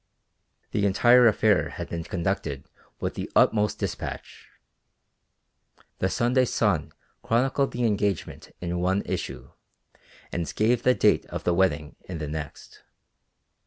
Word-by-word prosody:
The 100 -1 +1
entire 120 +5 +6
affair 105 -2 +3
had - - -6
been 85 -1 -4
conducted 85 -7 -3 0.4
with - - -2
the - - -5
utmost 105 -2 +3
dispatch. - - -6 1.5
The 95 - +1
Sunday 125 +5 +2
Sun 100 - 0 0.3
chronicled 135 +4 +1
the 120 - -3
engagement 100 -4 -1
in 85 0 -2
one 95 +3 +1
issue, - - -5 0.8
and 85 -2 -3
gave 115 +3 +2
the 125 0 +3
date - - +3
of - - -6
the 90 - +2
wedding 80 -5 0
in 90 - -6
the 75 -1 -4
next. 75 -1 -7
100 Hz, 125 wpm, -26 LUFS, 85-115 Hz, 1.5 s, entire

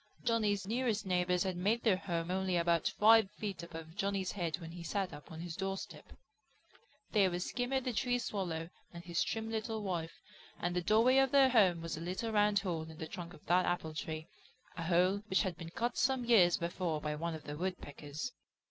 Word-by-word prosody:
Johnny's 215 -4 +1
nearest 225 -1 0
neighbors 180 -1 +1
had 190 -2 -2
made 205 +7 +1
their 215 -5 +4
home 170 -2 -3
only 190 -1 0
about 170 -1 +2
five 220 -1 +5
feet 195 -5 -5
above 165 -1 -9
Johnny's 195 -2 -1
head 170 -5 -2
when 165 -2 -9
he 175 0 -8
sat 190 +2 -2
up 145 - -11
on 160 - -8
his 170 -1 -5
doorstep. 195 +1 -5 1.0
They 200 -3 +4
were 175 - -2
Skimmer 245 +7 -1
the 250 -1 -2
Tree 245 +2 +1
Swallow 180 -8 -3 0.2
and 170 0 -9
his 170 -1 -1
trim 225 0 -2
little 220 -1 -2
wife, 170 -4 -3 0.4
and 175 0 -1
the 180 - +1
doorway 225 +8 +4
of 270 0 +4
their 270 0 +6
home 190 -9 +4
was 165 -2 -4
a - - -6
little 185 +7 -3
round 210 -1 +3
hole 170 -5 -2
in 160 - -11
the 160 - -5
trunk 175 0 -7
of - - -19
that 180 +2 +3
apple 165 -3 -1
tree, 155 0 -4 0.5
a - - -5
hole 180 +4 +3
which 190 0 +2
had 185 -4 -2
been 165 -1 -8
cut 235 +6 -2
some 260 -2 +2
years 190 -8 +6
before 170 -2 -2
by 150 0 -2
one 165 +2 -3
of 155 - -9
the 145 - -6
Woodpeckers. 155 - -5
185 Hz, 205 wpm, -34 LUFS, 170-215 Hz, 1.0 s, their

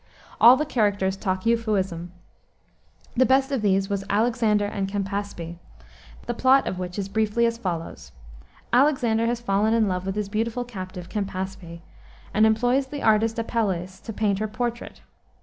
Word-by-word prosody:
All 245 +2 +8
the 305 - -1
characters 205 -8 +1
talk 190 -1 -3
Euphuism. 195 -7 0 1.0
The 255 - +5
best 265 +1 +3
of 270 -5 0
these 195 -2 +2
was 200 -1 -2
Alexander 215 -1 +2
and 200 -1 -2
Campaspe, 195 -4 -4 0.7
the 240 - -2
plot 260 +3 +4
of 185 - -3
which 180 0 -5
is 195 -2 -2
briefly 220 +3 +1
as 230 0 -1
follows. 170 -6 -5 0.6
Alexander 245 -4 +3
has 240 0 -1
fallen 215 0 +1
in 225 -2 +3
love 185 0 -2
with 195 - -2
his 210 -1 -2
beautiful 225 +4 -2
captive, 185 -6 -8
Campaspe, 190 -4 -5 0.5
and 215 +1 +5
employs 245 +5 +2
the 285 +1 -6
artist 220 +1 +3
Apelles 195 -6 -2
to 225 - -8
paint 205 -2 0
her 215 - -1
portrait. 240 +2 -4
210 Hz, 155 wpm, -24 LUFS, 190-235 Hz, 1.0 s, All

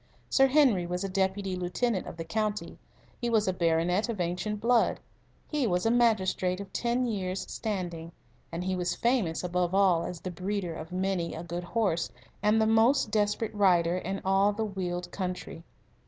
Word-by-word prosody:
Sir 270 0 +5
Henry 255 - +4
was 180 +2 -2
a 195 - -2
Deputy 190 0 0
Lieutenant 185 +4 -1
of - - -8
the 165 - -4
county; 210 +4 -2 0.4
he 240 - -1
was 220 -3 +2
a 185 - +2
baronet 175 +5 +1
of 220 -4 -3
ancient 180 +5 -2
blood; 235 +1 +3 0.5
he 295 -5 0
was 180 0 0
a 225 - +4
magistrate 195 -6 +2
of 200 -1 -8
ten 240 +1 0
years' 190 -5 -2
standing; 175 -6 -4 0.4
and 170 +2 -3
he 185 0 -1
was 180 -1 -1
famous 230 -10 0
above 180 0 0
all 185 -4 +4
as 175 0 -5
the 185 - -4
breeder 185 0 -3
of 160 +1 -8
many 185 -2 -1
a 165 - -6
good 175 +1 -5
horse 190 -5 0 0.3
and 210 +1 +3
the 220 - +4
most 225 +2 +3
desperate 210 +1 0
rider 180 -4 +3
in 195 +2 -3
all 195 +2 +4
the 220 +2 -2
Weald 180 -3 -4
country. 180 -3 -5
190 Hz, 180 wpm, -29 LUFS, 180-220 Hz, 0.5 s, Sir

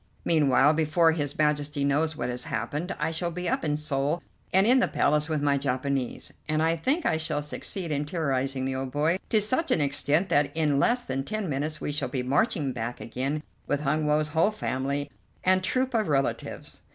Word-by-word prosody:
Meanwhile, 145 -2 +4
before 160 +1 +3
his 145 -3 -2
Majesty 150 -1 +1
knows 155 +3 +1
what 120 -3 -3
has 125 +4 -4
happened, 160 +3 -3
I 150 +2 -1
shall 170 +2 -2
be 180 +1 -4
up - - 0
in 150 -2 0
Seoul 150 +2 -1 0.3
and 190 +2 +4
in 255 +3 +5
the - - +3
Palace 150 +2 +1
with 155 -2 -1
my 140 -1 +2
Japanese, 135 -1 -2 0.2
and 155 0 +2
I 165 +1 +2
think 275 - 0
I 160 - +2
shall 160 -2 -2
succeed 170 +3 -3
in 145 0 0
terrorizing 135 -4 -1
the 135 - -1
old 130 0 -3
boy 155 +6 +1
to 220 - +4
such 255 +11 +1
an - - +3
extent 150 +5 +1
that 145 -1 +2
in 150 -3 +2
less 240 - +3
than 135 +1 -3
ten 215 +5 -3
minutes 150 +1 -2
we - - -3
shall 145 -3 -2
be 130 -1 -2
marching 145 - +1
back 120 0 -4
again 135 +6 -3 0.2
with 145 0 0
Hun 150 +1 0
Woe's 150 0 +2
whole 160 +6 +3
family 140 -8 -2 0.3
and 185 0 +3
troop 255 +6 0
of 220 -3 +1
relatives. 140 -3 -1
150 Hz, 200 wpm, -27 LUFS, 140-165 Hz, 0.3 s, in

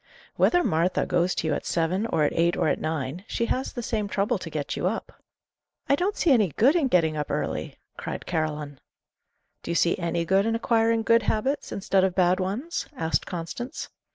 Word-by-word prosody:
"Whether 355 0 +3
Martha 175 -1 +1
goes 175 +1 +1
to 160 - -1
you 155 - +1
at - - -2
seven, 180 +6 0
or 155 - +1
at 150 - +1
eight, 170 +1 +2
or - - +1
at - - 0
nine, 155 +2 -3
she 235 - -1
has 260 +3 -1
the 240 - -5
same 215 -2 -1
trouble 200 +2 0
to 175 - -7
get 150 -3 -3
you - - 0
up." 220 +4 -3 0.8
"I - - +3
don't 370 +7 -1
see 335 - +3
any 225 -7 +5
good 265 - +4
in 315 -6 +3
getting 165 -8 +2
up 150 -1 -3
early," - - -3 0.2
cried - - -5
Caroline. 150 -4 -3 0.8
"Do - - -9
you 170 - 0
see 170 - +3
any 170 -1 -1
good 195 +4 +3
in 225 - +1
acquiring 230 0 +2
good 230 +1 +4
habits, 225 +7 -1
instead 195 -1 +1
of 190 -1 +1
bad 180 0 +3
ones?" 220 - -3
asked 160 0 0
Constance. 175 +8 -5
185 Hz, 205 wpm, -26 LUFS, 165-230 Hz, 0.8 s, any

